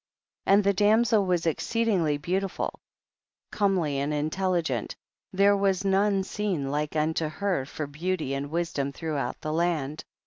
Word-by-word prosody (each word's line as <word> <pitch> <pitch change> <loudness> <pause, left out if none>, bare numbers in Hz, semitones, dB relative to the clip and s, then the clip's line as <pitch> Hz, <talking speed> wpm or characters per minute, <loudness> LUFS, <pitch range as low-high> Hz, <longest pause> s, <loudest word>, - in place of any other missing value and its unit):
8. - - +4
And 200 +1 +6
the 200 0 +3
damsel 210 +1 +3
was 175 -2 +1
exceeding 210 +3 +1
ly 150 -2 +1
beautiful, 185 +5 -2 0.7
comely 180 -9 +1
and 140 +2 -1
intelligent, 170 +3 -1 0.4
there 200 +1 +4
was 195 -1 +1
none 195 0 +2
seen 185 -9 -2
like 150 +1 -2
unto 155 +1 +1
her 175 -4 -2
for 155 - -4
beauty 155 0 -2
and 140 +1 -3
wisdom 160 -4 -1
throughout 140 -4 -3
the 155 - -3
land. 160 -3 -1
175 Hz, 145 wpm, -27 LUFS, 150-195 Hz, 0.7 s, And